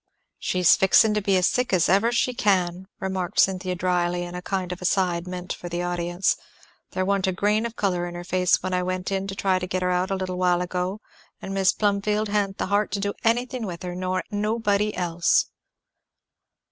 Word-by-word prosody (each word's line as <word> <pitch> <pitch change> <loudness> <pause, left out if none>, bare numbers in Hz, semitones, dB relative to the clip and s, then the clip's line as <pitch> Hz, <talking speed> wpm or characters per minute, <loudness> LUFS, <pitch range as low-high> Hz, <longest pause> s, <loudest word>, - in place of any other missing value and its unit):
"She's 180 -1 +4
fixing 210 +3 +5
to 210 - 0
be 195 -1 +2
sick 250 +6 +1
as 180 -3 +3
fast - - 0
as 190 - +6
ever 225 +4 +2
she 245 +1 +1
can," 185 -4 +1
remarked 190 -1 -2
Cynthia 185 -1 +2
dryly, 175 -1 0
in 175 0 -7
a 180 - -5
kind 185 -1 -3
of 180 - -6
aside 180 -2 0
meant 180 0 -5
for 175 - -8
the 175 +1 -2
audience; 175 +1 0 0.6
"there 185 - 0
wa'n't 195 -1 +1
a - - +2
grain 210 +5 +1
of 230 - -12
colour 180 -3 0
in 175 - -7
her 175 - -6
face 180 0 +2
when 185 0 -2
I 180 - +1
went 185 +1 -3
in 195 0 -1
to 195 - -5
try 190 -1 +1
to 180 - -4
get 185 0 -2
her 180 - +1
out 180 +1 0
a 195 - 0
little 185 -1 -3
while 180 -1 +2
ago; 180 +3 -3 0.4
and 195 - -6
Mis' 195 -1 +3
Plumfield 210 +1 0
ha'n't 200 -2 0
the - - -1
heart 205 +1 +2
to 200 - 0
do 200 0 -1
anything 240 0 0
with 175 -2 -7
her, 180 -1 -4
nor 185 0 -2
nobody 210 0 0
else." 175 -1 +1
185 Hz, 215 wpm, -24 LUFS, 180-200 Hz, 0.6 s, as